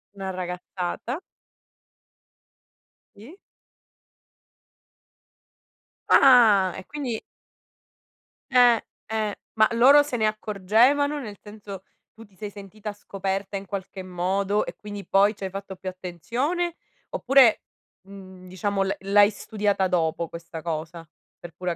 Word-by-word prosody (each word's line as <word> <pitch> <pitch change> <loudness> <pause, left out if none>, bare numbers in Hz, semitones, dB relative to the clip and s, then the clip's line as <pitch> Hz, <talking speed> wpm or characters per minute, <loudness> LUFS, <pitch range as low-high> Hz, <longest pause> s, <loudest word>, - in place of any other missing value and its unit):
Una 195 -1 -5
ragazzata. 180 - -5 2.0
Sì. 230 - -13 2.7
Ah! 215 -8 +6
E, 190 - -9
quindi 265 -7 -4 1.3
Eh. 245 -3 +5 0.3
Eh. 215 -2 -1 0.2
Ma 215 -1 +5
loro 265 +5 +7
se 290 -4 -3
ne 220 - +1
accorgevano, 220 +8 +2
nel 210 -7 -8
senso, 205 -2 -10 0.3
tu 225 +1 -14
ti 200 -2 -26
sei 210 +2 -6
sentita 205 +1 -8
scoperta 195 -1 -4
in 195 0 -4
qualche 190 0 -6
modo 190 +3 -1
e - - -6
quindi 205 -1 -8
poi 200 +2 +3
ci 200 - -10
hai 190 - -2
fatto 195 0 -7
più 185 0 -6
attenzione, 240 - -3 0.3
oppure, 260 -4 +4 0.5
mhmm, 190 -2 -12
diciamo 195 +2 -2
l'ha 195 +1 -1
l'hai 200 +1 +5
studiata 205 -2 -1
dopo 170 -2 0
questa 165 0 -9
cosa, 165 0 -5 0.3
per 170 -1 -11
pura 180 -1 -3
200 Hz, 115 wpm, -25 LUFS, 185-220 Hz, 2.7 s, loro